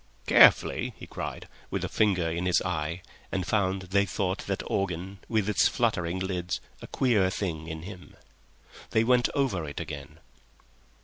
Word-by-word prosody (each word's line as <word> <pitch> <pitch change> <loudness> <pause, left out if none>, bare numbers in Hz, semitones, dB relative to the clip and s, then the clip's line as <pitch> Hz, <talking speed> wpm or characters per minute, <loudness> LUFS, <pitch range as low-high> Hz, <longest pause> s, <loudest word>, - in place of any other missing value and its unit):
"Carefully," - - +5
he - - -9
cried, - - -6 0.2
with - - -2
a - - -1
finger 95 -6 +2
in 85 +3 -2
his 90 - +4
eye, 85 0 -3 0.3
and 95 -2 -1
found 95 -2 0
they 100 +2 +2
thought 95 +1 -1
that 100 -1 -2
organ, 95 0 -2
with 110 -3 +1
its 105 - +4
fluttering 85 +1 0
lids, 90 -1 -2 0.2
a - - -8
queer 110 -8 +2
thing 80 -5 -3
in 80 -1 -6
him. 90 -1 -10 0.7
They 110 - +3
went 125 0 +3
over 130 - +1
it 70 - -6
again. 70 +2 -7
95 Hz, 160 wpm, -28 LUFS, 85-100 Hz, 0.7 s, Carefully